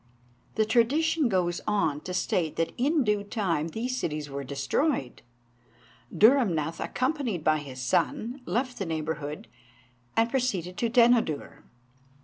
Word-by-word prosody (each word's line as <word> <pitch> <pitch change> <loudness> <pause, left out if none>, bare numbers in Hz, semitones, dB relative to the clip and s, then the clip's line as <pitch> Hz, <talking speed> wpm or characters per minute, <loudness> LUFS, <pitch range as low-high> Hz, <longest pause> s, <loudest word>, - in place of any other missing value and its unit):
The 220 - +2
tradition 280 +6 +2
goes 175 -3 0
on 180 -9 +1
to 180 - -6
state 165 -4 0
that 165 0 -1
in 290 +4 +2
due 210 -2 +1
time 190 -8 -1
these 235 +9 -3
cities 150 - -3
were 140 0 -4
destroyed; 140 - -1 0.9
Dhurrumnath, 190 - +3
accompanied 255 - -2
by 155 -1 +3
his 135 -3 -9
son, 235 - 0
left 245 +7 -1
the 195 - -2
neighbourhood, 155 -2 -4 0.7
and 225 0 +4
proceeded 220 -9 -1
to 235 +2 0
Denodur. 235 - +2
200 Hz, 125 wpm, -27 LUFS, 155-245 Hz, 0.9 s, and